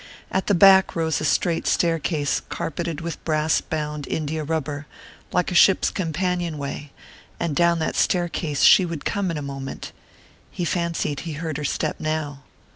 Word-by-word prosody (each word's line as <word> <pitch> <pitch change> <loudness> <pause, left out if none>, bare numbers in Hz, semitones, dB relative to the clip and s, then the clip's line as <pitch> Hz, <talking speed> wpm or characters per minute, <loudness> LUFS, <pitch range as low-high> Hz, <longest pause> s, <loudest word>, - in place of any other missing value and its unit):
At 190 - -1
the 205 - +3
back 190 +1 +6
rose 160 -2 0
a - - -1
straight 165 +3 +1
staircase 160 -3 +1
carpeted 165 0 -4
with 165 0 -6
brass 155 -1 +1
bound 150 -2 -4
India 155 0 -2
rubber, 150 -1 -3 0.4
like 180 +1 0
a - - -2
ship's 185 +2 +5
companion 175 -1 -2
way; 140 0 -6 0.5
and 165 -4 -1
down 170 +1 +3
that 160 - -2
staircase 170 -4 0
she 190 - +8
would 165 -4 -5
come 200 -2 -1
in 165 - -2
a 150 - -4
moment 135 -1 -6 0.6
he 175 - -4
fancied 170 -5 -1
he 165 +1 -5
heard 155 -1 -4
her 150 - -5
step 145 - -2
now.... 155 -3 -3
160 Hz, 165 wpm, -23 LUFS, 150-170 Hz, 0.6 s, she